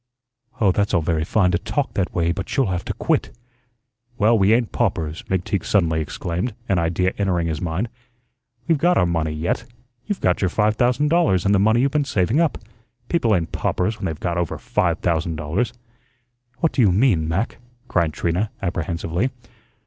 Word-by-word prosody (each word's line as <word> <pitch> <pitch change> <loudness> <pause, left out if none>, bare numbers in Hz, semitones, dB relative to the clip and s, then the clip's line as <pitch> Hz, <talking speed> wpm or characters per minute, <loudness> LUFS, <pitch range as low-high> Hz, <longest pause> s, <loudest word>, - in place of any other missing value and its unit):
"Oh, 100 -4 +4
that's 100 +2 0
all 85 - +2
very 80 0 0
fine 90 +2 +2
to 85 - +1
talk 145 +6 -2
that 100 -3 -1
way, 85 -1 +1
but 90 - -4
you'll 130 -8 +2
have 90 - -2
to - - -2
quit." - - 0 0.9
"Well, 110 +3 +4
we 100 -1 +4
ain't 115 0 +2
paupers," 85 -9 -1
McTeague 95 0 -1
suddenly 80 -5 +2
exclaimed, 90 +8 -3
an 95 -3 +2
idea 90 +3 0
entering 90 -4 +1
his 80 -2 -2
mind. 90 +6 -1 0.8
"We've 165 -4 +2
got 175 +3 +3
our 90 - +4
money 80 -2 0
yet. 80 +8 -2 0.4
You've 205 - -2
got 90 - +1
your 95 - +2
five 105 +3 +1
thousand 125 +5 +2
dollars 160 - +2
and 100 - +3
the 100 - +4
money 110 +4 +4
you've 140 +1 +2
been 150 0 +1
saving 110 - +1
up. 165 -3 +2 0.5
People 115 -11 +2
ain't 85 -3 -2
paupers 110 +5 -1
when 100 - -2
they've 80 -2 -5
got 85 -1 -1
over 85 - -2
five - - 0
thousand 85 -1 0
dollars." 85 +11 -1 0.9
"What 165 - +3
do 135 - +1
you 105 -5 +5
mean, 95 -6 +3
Mac?" 95 +10 -2 0.3
cried 85 -7 +1
Trina, 90 +7 -1
apprehensively. 85 +3 -2
95 Hz, 185 wpm, -22 LUFS, 85-115 Hz, 0.9 s, you